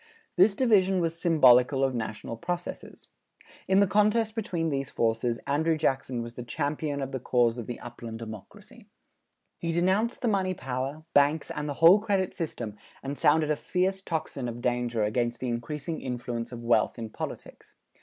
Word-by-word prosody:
This 195 +3 +5
division 195 -6 +3
was 165 -1 -2
symbolical 135 -5 +5
of 135 -1 +1
national 115 -1 -4
processes. 175 +8 -6 0.6
In 190 +1 +4
the - - +6
contest 215 +2 +2
between 180 -7 -2
these 135 -1 -2
forces, 115 +1 0
Andrew 160 +3 +1
Jackson 130 -5 -1
was 115 0 -8
the 125 - -7
champion 145 +3 -2
of 135 - -5
the 130 - -3
cause 120 -1 +1
of 115 - -6
the 120 - -5
upland 120 -2 -8
democracy. 110 -3 -11 0.7
He 165 - -2
denounced 190 +7 +1
the - - +2
money 190 -3 +1
power, 135 +3 -4
banks 145 +2 +3
and 150 0 -4
the 145 - -3
whole 170 +7 +7
credit 200 -3 0
system 120 - -5 0.3
and 140 +1 -4
sounded 155 +1 +3
a - - +2
fierce 190 +4 -1
tocsin 155 -8 -3
of 120 +1 -7
danger 120 -2 0
against 120 +2 -1
the 130 - -3
increasing 150 +7 -4
influence 120 -1 -4
of 120 -1 -8
wealth 120 +2 +2
in 115 -2 -6
politics. - - -8
140 Hz, 170 wpm, -28 LUFS, 120-175 Hz, 0.7 s, whole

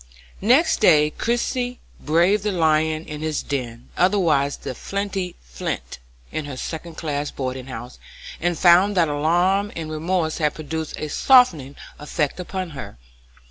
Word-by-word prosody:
] - - -25 0.2
Next 325 - +1
day 150 -7 +5
Christie 245 - -2 0.2
braved 175 +7 +2
the 210 +1 -1
lion 160 -2 +1
in 150 0 -7
his 155 -1 -2
den, 120 -4 -5
otherwise 170 -7 +2
the - - -6
flinty 195 - -4
Flint, - - -5 0.3
in 155 - -3
her 140 -3 -7
second 165 +3 -6
class 145 -3 -3
boarding 130 -1 -5
house, 125 0 -8 0.4
and 175 0 0
found 185 +3 +5
that 165 -3 +4
alarm 175 +7 +1
and 160 -2 -5
remorse 160 +1 -1
had 150 -2 +1
produced 160 0 -5
a 155 - -4
softening 160 - +4 0.2
effect 150 +1 -2
upon 185 -1 -4
her. 130 - -8
160 Hz, 145 wpm, -22 LUFS, 145-185 Hz, 0.4 s, day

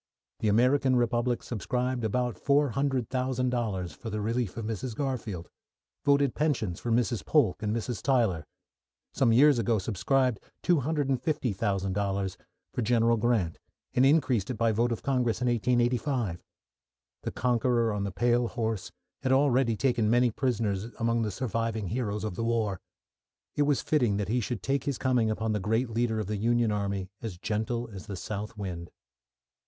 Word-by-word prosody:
The 110 - 0
American 130 +5 +3
Republic 120 0 +1
subscribed 125 +2 -2
about 120 +2 0
$400,000 125 - 0
for 115 - -7
the 105 0 -3
relief 115 -1 -1
of 115 - -4
Mrs. 110 +2 -4
Garfield; 115 - -3 0.6
voted 140 -2 +3
pensions 120 - -1
for 120 - -3
Mrs. 120 -1 +1
Polk 135 - +2
and 105 -1 -1
Mrs. 115 -1 -3
Tyler; 115 - +1 0.7
some 125 -4 +3
years 135 +2 +6
ago 115 0 +2
subscribed 120 +5 +1 0.2
$250,000 115 - 0 0.4
for - - -1
General 115 0 +3
Grant, 110 -7 0 0.3
and 125 - +3
increased 135 - +3
it 130 - -2
by 115 0 +2
vote 120 +3 +1
of 115 - -3
Congress 125 -5 +1
in 125 - 0
1885. 120 - +1 0.8
The - - -4
Conqueror 120 -1 +1
on 100 -1 -2
the 100 - -2
pale 120 +6 +2
horse 110 -5 -3 0.3
had 130 0 0
already 130 -3 +3
taken 120 -4 +1
many 120 +1 +4
prisoners 110 -5 -1
among 115 0 +1
the 110 - 0
surviving 115 -2 -2
heroes 105 -2 -2
of 105 -3 -2
the 115 - -3
war. 110 -5 0 0.7
It 145 - +3
was 145 - +1
fitting 120 -10 +2
that 100 -2 -2
he 125 +3 +2
should 120 -1 -4
make 140 +1 0
his 140 -3 -1
coming 125 -4 +2
upon 110 0 -1
the 105 - 0
great 115 +5 0
leader 115 -1 0
of 105 - -2
the 105 +2 -3
Union 115 +1 +2
Army 100 -2 -2
as 110 -6 -5
gentle 110 +5 -2
as 95 - -9
the 100 - -5
south 105 +4 -5
wind. 90 -4 -5
115 Hz, 160 wpm, -28 LUFS, 105-125 Hz, 0.8 s, years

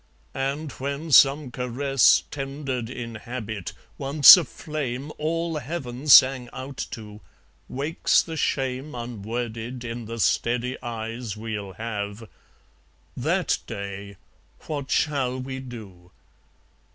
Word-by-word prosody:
And 140 +3 -2
when 140 +5 -5
some 135 +1 +6
caress 125 +2 +3
Tendered 135 -4 -4
in 120 -2 -6
habit 110 -5 -6 0.3
(once 140 +4 +9
a 180 - 0
flame 145 -2 -5
All 165 +1 -1
heaven 140 -2 -6
sang 130 -3 +7
out 135 +1 -6
to) 105 -1 -9 0.5
wakes 145 +5 +1
the 165 - -6
shame 135 -1 -2
Unworded, 120 +1 -5
in 115 0 -5
the 115 +1 -6
steady 120 +3 +1
eyes 115 -2 -5
We'll 105 -3 -5
have, 105 +1 -5 0.9
THAT - - 0
day, 100 0 -7 0.5
what 145 -3 -4
shall 135 -4 0
we 130 +1 -5
do? 105 -9 -11
125 Hz, 110 wpm, -25 LUFS, 115-140 Hz, 0.9 s, once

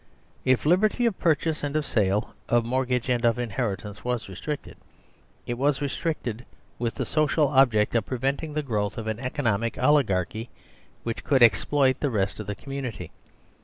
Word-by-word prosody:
If 130 0 +3
liberty 210 +9 +3
of 225 -5 0
purchase 160 -1 +1
and 145 0 -2
of 155 -1 +1
sale, 105 -2 0 0.2
of 120 -1 +3
mortgage 125 0 0
and 125 -1 +1
of 115 0 +3
inheritance 105 -3 -3
was 125 -3 -2
restricted, 140 +11 -6 0.7
it 120 0 -4
was 140 0 +2
restricted 140 -5 -3 0.4
with 115 -1 -2
the - - -2
social 155 -1 +2
object 125 -6 +4
of 115 -3 +1
preventing 135 +4 -2
the 150 - 0
growth 105 -6 -2
of 115 - -4
an 110 0 -3
economic 120 -5 -1
oligarchy 110 - +1 0.5
which 115 -1 -4
could 135 -4 +4
exploit 130 +5 +4
the 145 - 0
rest 100 -4 -1
of 105 - -6
the 105 - -3
com 135 +5 -9
munity. 125 - -5
125 Hz, 165 wpm, -26 LUFS, 110-145 Hz, 0.7 s, object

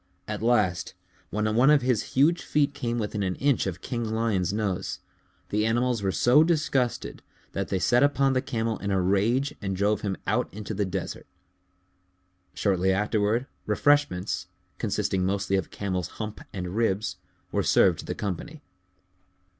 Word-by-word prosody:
At 105 0 -4
last, 105 -7 +1 0.3
when 105 +1 -1
one 125 +5 +5
of 150 -3 +5
his 125 -4 +2 0.2
huge 165 +5 +4
feet 145 -1 +1
came 120 -4 -2
within 105 -2 -2
an 95 -2 -1
inch 140 -6 +1
of 95 -1 -4
King 120 -2 -3
Lion's 110 -4 0
nose, 100 -3 -2 0.5
the 105 +1 +1
animals 120 +1 +1
were 95 -1 0
so 125 +10 +5
disgusted 150 -7 0 0.3
that - - -3
they 95 - -1
set 120 +8 +3
upon 140 -1 +3
the 130 - +2
Camel 115 -4 -2
in 100 - -3
a 95 -1 +2
rage 110 +10 +1
and 95 -2 -2
drove 100 +2 +1
him 100 -4 -2
out - - 0
into 105 +1 -6
the 100 0 0
desert. 95 0 -5 1.3
Shortly 95 -2 +2
afterward, 105 +4 +1 0.2
refreshments, 110 -4 +1 0.3
consisting 95 -1 0
mostly 100 +1 0
of 95 -3 -1
Camel's 95 -4 -3
hump 110 -1 -5
and 90 -1 -5
ribs, 110 -2 0 0.3
were - - +1
served - - +4
to - - -7
the - - -4
company. 145 - -5
105 Hz, 160 wpm, -26 LUFS, 95-125 Hz, 1.3 s, one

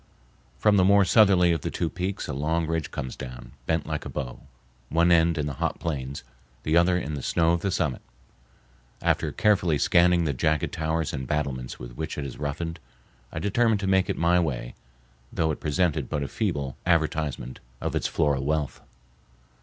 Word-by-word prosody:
From 105 +6 +4
the 95 - +5
more 100 +1 +5
southerly 95 -5 +5
of 80 -3 0
the - - -2
two 85 - -1
peaks 95 +4 -3
a 75 - -3
long 80 +4 0
ridge 80 -1 -2
comes 65 -2 -5
down, 65 -1 -9 0.2
bent 80 -1 +1
like - - -3
a - - -6
bow, 65 -5 -5 0.5
one 85 +3 +3
end 85 0 +4
in 75 - 0
the 75 - -3
hot - - -1
plains, 70 -4 -4 0.4
the 80 +4 +1
other 90 +1 +4
in 75 -3 -3
the 70 - -4
snow 80 +5 +2
of 85 0 +1
the 100 - 0
summit. - - -1 1.0
After - - +1
carefully 90 -7 +2
scanning 85 +3 +4
the 75 - 0
jagged 75 +3 0
towers 80 -1 -1
and 65 -3 -4
battlements 65 -4 -2
with - - -9
which 80 - -4
it 70 - -3
is 65 - -7
roughened, 80 +3 -3 0.5
I - - -7
determined 105 +4 +2
to - - -2
make 95 -1 +2
it - - -1
my 85 +1 +3
way, 60 -8 -2 0.6
though 80 -1 +1
it 75 - -4
presented 80 +1 0
but 75 - -1
a - - -3
feeble 75 - -2
advertisement 80 -6 0 0.2
of - - -3
its - - 0
floral 70 -2 +1
wealth. 75 0 -1
80 Hz, 190 wpm, -26 LUFS, 70-90 Hz, 1.0 s, the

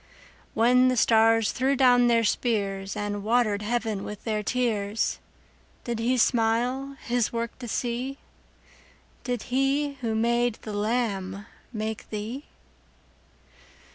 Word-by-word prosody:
When 250 +3 +5
the 255 -1 +1
stars 225 -1 +4
threw 265 +2 +1
down 245 -2 +5
their 230 -1 +3
spears, 200 -4 -1
And 205 -1 -3
water'd 215 -2 +2
heaven 220 -2 -2
with 210 -1 -7
their 215 -2 -1
tears, 215 -3 -1 0.6
Did 235 -2 -3
He 245 +3 +1
smile 245 +4 +1
His 240 -2 0
work 235 +1 -4
to 245 - -7
see? 245 +4 -3 1.1
Did 245 -3 -3
He 275 +2 +1
who 225 -2 -1
made 235 +1 +1
the 215 - -6
lamb 205 -3 -2 0.3
make 220 -1 -5
thee? 225 +7 -5
230 Hz, 120 wpm, -26 LUFS, 215-245 Hz, 1.1 s, When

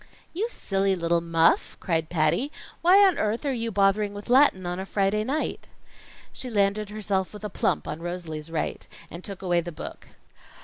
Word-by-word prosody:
"You 405 +7 -1
silly 195 - 0
little 170 -1 +1
muff!" 165 -1 +2
cried 165 -3 -1
Patty. 170 - +1 0.3
"Why 380 +4 +7
on 375 -3 +3
earth 215 +6 -1
are 275 - +1
you 230 -2 -2
bothering 200 +1 +2
with 205 +4 -6
Latin 255 -9 +5
on 175 +1 -3
a 190 - -4
Friday 200 +2 +1
night?" 280 +7 -2 0.7
She 255 - -6
landed 205 -1 +1
herself 200 -3 -2
with 210 - -10
a 210 - -4
plump - - 0
on 150 +2 -5
Rosalie's 170 -3 -5
right, 165 -1 -3 0.2
and 170 +2 -8
took 195 -1 -7
away 175 -2 +2
the 175 +1 -6
book. 155 - -9
195 Hz, 180 wpm, -26 LUFS, 170-215 Hz, 0.7 s, Why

